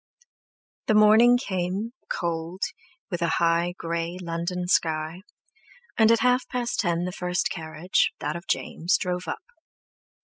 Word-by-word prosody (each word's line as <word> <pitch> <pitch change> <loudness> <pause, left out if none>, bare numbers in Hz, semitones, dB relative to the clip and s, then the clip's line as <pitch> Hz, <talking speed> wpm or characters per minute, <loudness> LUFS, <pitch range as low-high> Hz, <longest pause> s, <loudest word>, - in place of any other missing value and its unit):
_ - - -53
The 215 - +3
morning 220 +3 +7
came, 195 0 -2 0.2
cold, 170 +2 -3 0.5
with 175 -1 -3
a 170 -1 +1
high, 170 +1 +2
grey, 170 +1 -3
London 175 +1 -3
sky, 160 0 0 0.7
and 220 0 +5
at 230 - +4
half 250 0 +3
past 245 -1 -2
ten 175 -3 +1
the 180 - -3
first 180 0 -1
carriage, 160 +3 0
that 150 +2 -3
of 170 +2 -8
James, 170 +4 0
drove 180 -1 -3
up. - - -4
180 Hz, 140 wpm, -25 LUFS, 170-205 Hz, 0.7 s, morning